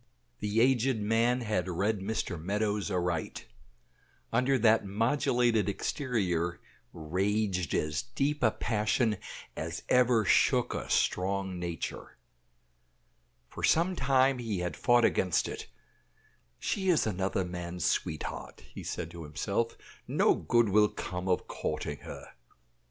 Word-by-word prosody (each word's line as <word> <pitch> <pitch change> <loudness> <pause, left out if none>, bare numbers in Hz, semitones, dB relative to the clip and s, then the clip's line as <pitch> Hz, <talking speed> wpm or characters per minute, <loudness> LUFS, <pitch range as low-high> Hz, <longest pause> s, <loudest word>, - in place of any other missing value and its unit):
The 105 +2 +1
aged 130 0 +3
man 115 +4 +2
had 105 -5 -1
read 100 +4 0
Mr. 95 -4 -3
Meadows 105 +2 -1
aright; 90 -3 -2 0.9
under 125 +3 +3
that 110 -1 +4
modulated 115 0 +1
exterior 95 - -1 0.3
raged 95 +2 -1
as 75 -1 0
deep 140 - -2
a 115 - +5
passion 110 0 0 0.4
as 80 +1 -5
ever 125 -3 +4
shook - - +3
a - - -5
strong 95 0 0
nature. 85 -1 -5 1.3
For - - -9
some 175 +3 +3
time 130 -2 +3
he 115 -5 -2
had 90 -3 -3
fought 120 -1 +4
against 90 -3 +2
it. - - -6 0.9
"She 190 -2 -1
is 170 -5 +4
another 95 -2 -1
man's 90 0 -4
sweetheart," 80 -2 -2
he - - -8
had - - -8
said - - -4
to 85 -1 -8
himself; 100 +10 -2 0.3
"no - - +3
good 120 -2 +2
will 105 +1 +5
come 90 +1 -5
of 90 -1 +1
courting 75 - -3
her." - - -9
105 Hz, 125 wpm, -30 LUFS, 90-120 Hz, 1.3 s, a